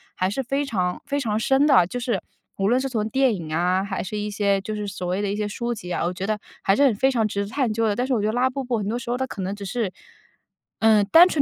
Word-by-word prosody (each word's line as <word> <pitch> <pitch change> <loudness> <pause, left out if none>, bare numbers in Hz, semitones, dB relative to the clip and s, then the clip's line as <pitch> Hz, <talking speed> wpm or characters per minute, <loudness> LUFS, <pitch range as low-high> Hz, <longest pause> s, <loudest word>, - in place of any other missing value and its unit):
还 185 - 0
是 205 +8 -2
非 275 +3 -1
常 180 -8 -1
非 285 0 -1
常 220 -5 -1
深 270 +5 +3
的。 265 - +6
就 245 - -4
是 235 -7 -1 0.4
无 195 +1 +1
论 245 +2 +3
是 270 - -1
从 220 -4 -1
电 265 +1 +3
影 165 -4 -7
啊， 180 +3 +1
还 195 -1 -3
是 190 - -6
一 210 0 -2
些 200 -1 +1
就 215 +3 -4
是 210 -1 -4
所 185 -2 -5
谓 180 +2 -1
的 205 - -1
一 - - -1
些 210 0 -2
书 235 +3 -3
籍 180 -5 -8
啊， - - -1
我 175 - -1
觉 185 +2 -4
得 215 -1 0 0.2
还 195 - +3
是 285 - +3
很 260 - +4
非 265 +6 +3
常 225 -4 +1
值 200 -1 -2
得 200 - -7
探 260 -1 0
究 225 0 +1
的。 205 - +1
但 245 - 0
是 265 - 0
我 225 - +1
觉 210 - 0
得 215 - 0
拉 250 +2 +3
布 270 +1 -4
布 245 -2 -1
很 205 -2 -3
多 235 +3 -1
时 235 - -8
候 245 - 0
它 260 - -1
可 200 -6 -7
能 190 +1 -2
只 200 -1 -8
是， 215 -1 -2 0.9
嗯， 220 -2 +5
单 340 +2 +9
纯 315 -5 +1
215 Hz, 335 characters per minute, -23 LUFS, 195-250 Hz, 0.9 s, 单